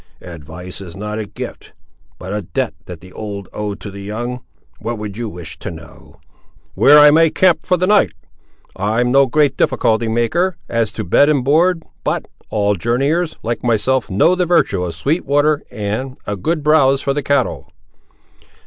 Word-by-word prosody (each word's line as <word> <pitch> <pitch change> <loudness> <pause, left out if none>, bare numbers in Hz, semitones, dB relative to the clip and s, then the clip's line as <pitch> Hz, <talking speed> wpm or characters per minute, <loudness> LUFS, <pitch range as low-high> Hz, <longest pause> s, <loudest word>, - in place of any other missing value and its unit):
"Advice 90 +3 -9
is 90 -2 -10
not 105 +1 -4
a 105 - -4
gift, - - -8 0.4
but 95 +2 -7
a 105 - -2
debt 85 - -3
that 90 -3 -9
the 90 +1 -14
old 100 -3 -6
owe 105 -1 -3
to 100 - -9
the 100 0 -9
young. 120 +5 -4 0.4
What 120 0 -4
would 105 -2 -6
you 115 0 -4
wish 85 -3 -8
to - - -5
know?" - - -13 0.5
"Where 145 +2 +6
I 150 0 +8
may 165 +1 +5
camp 180 +1 +2
for 180 - +3
the 180 - +1
night. 205 +2 +4 0.6
I'm 110 +5 0
no 135 +1 +5
great 145 +3 +2
difficulty 115 +1 +1
maker, 160 +11 0
as 115 -2 0
to 110 - -4
bed 140 - +4
and 140 -4 +2
board; 165 +4 +3 0.2
but, - - -1 0.2
all 105 -1 0
old 100 -3 0
journeyers, 140 - 0
like 115 +1 -2
myself, 120 +1 +1
know 105 - +3
the 180 -1 0
virtue 100 - +2
of 85 -2 -4
sweet 150 - -1
water, 145 +1 +2
and 115 +4 -4
a 105 - -3
good 155 - -2
browse 140 -3 +4
for 140 - 0
the 145 - -1
cattle." 140 -1 -1
120 Hz, 185 wpm, -18 LUFS, 100-150 Hz, 0.6 s, I